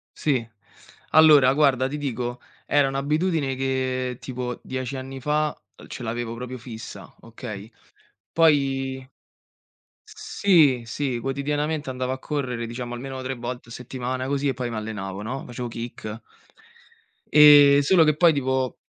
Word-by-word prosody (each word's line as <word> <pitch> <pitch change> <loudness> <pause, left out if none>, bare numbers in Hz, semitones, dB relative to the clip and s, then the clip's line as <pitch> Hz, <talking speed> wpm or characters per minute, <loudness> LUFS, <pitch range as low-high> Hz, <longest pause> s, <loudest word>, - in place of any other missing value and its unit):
Sì. 130 -7 0 0.7
Allora 150 -5 +7
guarda 135 -3 +3
ti 145 +3 -5
dico, 125 -3 -4 0.3
era 145 -1 +3
un'abitudine 145 +1 0
che 130 -1 -2
tipo 125 -1 -5
10 130 0 -4
anni 135 0 -7
fa, 150 +3 -1 0.2
ehm, - - -14
ce 130 - -8
l'avevo 115 0 -4
proprio 125 +2 -6
fissa, 110 -2 -10
okay. 115 -2 -9 0.6
Poi 135 -4 +1 1.0
sì, 155 -11 +2
sì 130 0 -2
quotidianamente 145 +3 -2
andavo 130 0 -3
a 130 - -6
correre 130 -5 -3
diciamo 120 +1 -6
almeno 130 +1 -6
3 130 0 -4
volte 120 0 -7
a - - -13
settimana 125 +1 -4
così 140 +1 -1
e 135 - +1
poi 125 0 -3
mi - - -5
allenavo, 105 -3 -5
no. 125 +6 -5
Facevo 120 0 -6
kick. 115 -1 -7 1.1
Ehm, 145 -1 +8
solo 165 +4 +5
che 155 -1 +3
poi 165 +1 +5
tipo 130 -2 -1
130 Hz, 140 wpm, -24 LUFS, 120-145 Hz, 1.1 s, Ehm